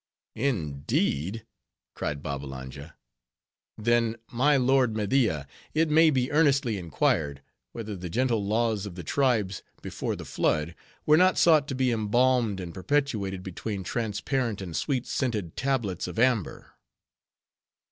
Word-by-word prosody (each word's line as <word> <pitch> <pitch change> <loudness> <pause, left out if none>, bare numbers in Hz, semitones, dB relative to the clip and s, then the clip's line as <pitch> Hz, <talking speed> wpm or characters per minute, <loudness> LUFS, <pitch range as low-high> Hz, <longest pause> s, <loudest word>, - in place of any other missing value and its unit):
"Indeed?" 90 - -1 0.5
cried 70 -1 -4
Babbalanja. 70 +1 -7 0.8
"Then, 115 +1 +2 0.2
my 140 +4 +3
lord 130 -3 +3
Media, 105 - +1 0.3
it 160 0 +2
may 160 +1 +6
be 130 -4 0
earnestly 140 -8 +2
inquired, 75 -3 0 0.3
whether 110 -3 -6
the 90 -1 -6
gentle 115 +1 +1
laws 110 0 0
of 90 - -9
the 90 - -7
tribes 110 - +1 0.2
before - - -3
the - - -8
flood, 75 +2 0 0.3
were 155 0 +6
not 185 +2 +4
sought 155 -4 +5
to 135 - -3
be 130 -1 +1
embalmed 115 -1 +2
and 85 -2 -6
perpetuated 100 - -1
between 95 +2 -5
transparent 115 +2 -2
and 90 -4 -6
sweet 130 -4 -1
scented 105 - -2
tablets 120 -9 -1
of - - -7
amber." 115 -5 +1
110 Hz, 125 wpm, -27 LUFS, 90-130 Hz, 0.8 s, may